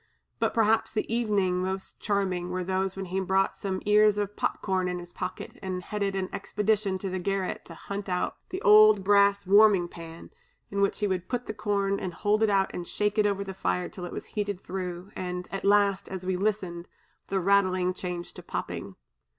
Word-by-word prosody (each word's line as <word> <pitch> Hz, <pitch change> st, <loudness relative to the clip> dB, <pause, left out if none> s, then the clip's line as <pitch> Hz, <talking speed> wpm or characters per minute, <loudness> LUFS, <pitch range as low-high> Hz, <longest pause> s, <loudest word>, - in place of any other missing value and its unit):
But -, -, 0 dB
perhaps 225 Hz, -1 st, +3 dB
the 215 Hz, -1 st, -1 dB
evenings 200 Hz, -6 st, +1 dB
most 190 Hz, +1 st, -4 dB
charming 185 Hz, -4 st, -1 dB
were 180 Hz, 0 st, -2 dB
those 190 Hz, +1 st, -1 dB
when 195 Hz, 0 st, -4 dB
he 185 Hz, +1 st, -2 dB
brought 190 Hz, +1 st, +1 dB
some 190 Hz, -2 st, -3 dB
ears 210 Hz, 0 st, +5 dB
of 205 Hz, 0 st, -2 dB
pop -, -, -1 dB
corn 185 Hz, -2 st, 0 dB
in 180 Hz, 0 st, -2 dB
his 175 Hz, 0 st, -10 dB
pocket 185 Hz, 0 st, -6 dB
and 185 Hz, -1 st, -4 dB
headed 200 Hz, -1 st, -2 dB
an 190 Hz, -1 st, -1 dB
expedition 210 Hz, -1 st, 0 dB
to 190 Hz, +1 st, -4 dB
the 185 Hz, -, -2 dB
garret 195 Hz, 0 st, -2 dB
to 165 Hz, -, -10 dB
hunt 200 Hz, +3 st, -6 dB
out 180 Hz, 0 st, -1 dB
the 370 Hz, +2 st, -5 dB
old 210 Hz, -1 st, +7 dB
brass 200 Hz, 0 st, +4 dB
warming 200 Hz, -2 st, +6 dB
pan; 165 Hz, -1 st, -10 dB, 0.4 s
in 200 Hz, 0 st, -1 dB
which 200 Hz, -, +2 dB
he 205 Hz, -, +2 dB
would 185 Hz, -2 st, -2 dB
put 245 Hz, 0 st, -2 dB
the -, -, -4 dB
corn, 200 Hz, -2 st, 0 dB
and 180 Hz, -3 st, -5 dB
hold 210 Hz, +1 st, +1 dB
it 220 Hz, -, +4 dB
out 195 Hz, -1 st, +2 dB
and 175 Hz, -1 st, -5 dB
shake 210 Hz, +1 st, 0 dB
it 210 Hz, -, +4 dB
over 200 Hz, -1 st, -1 dB
the 195 Hz, -1 st, -6 dB
fire 180 Hz, -1 st, -1 dB
till 180 Hz, -, -7 dB
it 175 Hz, -, -7 dB
was -, -, -6 dB
heated 205 Hz, -3 st, -3 dB
through, 185 Hz, 0 st, -5 dB
and 180 Hz, -1 st, -4 dB
at 195 Hz, -, -4 dB
last, 200 Hz, -1 st, +3 dB
as 185 Hz, -1 st, -6 dB
we 185 Hz, 0 st, 0 dB
listened, 185 Hz, -3 st, -2 dB, 0.4 s
the 195 Hz, -, 0 dB
rattling 185 Hz, -1 st, +2 dB
changed 180 Hz, -1 st, -5 dB
to -, -, -8 dB
popping. -, -, -5 dB
195 Hz, 205 wpm, -28 LUFS, 185-205 Hz, 0.4 s, old